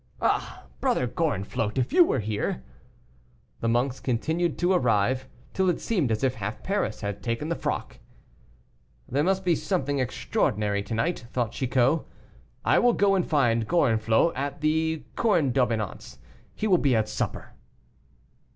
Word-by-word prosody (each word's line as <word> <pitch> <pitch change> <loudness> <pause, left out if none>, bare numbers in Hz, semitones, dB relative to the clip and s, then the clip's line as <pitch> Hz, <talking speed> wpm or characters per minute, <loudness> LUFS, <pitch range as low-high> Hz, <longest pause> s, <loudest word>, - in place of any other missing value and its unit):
Ah, - - -1
Brother 125 - +1
Gorenflot, 120 - -2
if 130 - 0
you 355 +1 +8
were 330 - 0
here!" 105 -11 -2 1.0
The 115 - 0
monks 125 +3 0
continued 160 +7 -1
to 175 +2 +2
arrive, 125 - +1 0.3
till 190 -1 +2
it 175 - 0
seemed 175 - 0
as 110 +2 -1
if 130 -2 +2
half 105 0 -5
Paris 195 - -1
had 100 -1 -4
taken 115 +6 -2
the 170 - 0
frock. - - -4 1.1
"There 140 +3 0
must 190 +2 +1
be 175 - +4
something 145 -8 -1
extraordinary 105 -4 0
to 110 +3 -4
night," 120 +1 -1
thought 120 -3 -1
Chicot. 130 +4 +1 0.6
"I - - +4
will 245 -1 +4
go 200 -2 +3
and 190 -2 +2
find 115 -7 +2
Gorenflot 115 -1 +2
at 140 +2 -4
the 160 +1 0
Corne 170 - +2
d'Abondance; 115 -5 -1 0.4
he - - -3
will 185 -5 +4
be 135 -4 +2
at 110 -1 +1
supper." - - -4
130 Hz, 150 wpm, -26 LUFS, 115-170 Hz, 1.1 s, you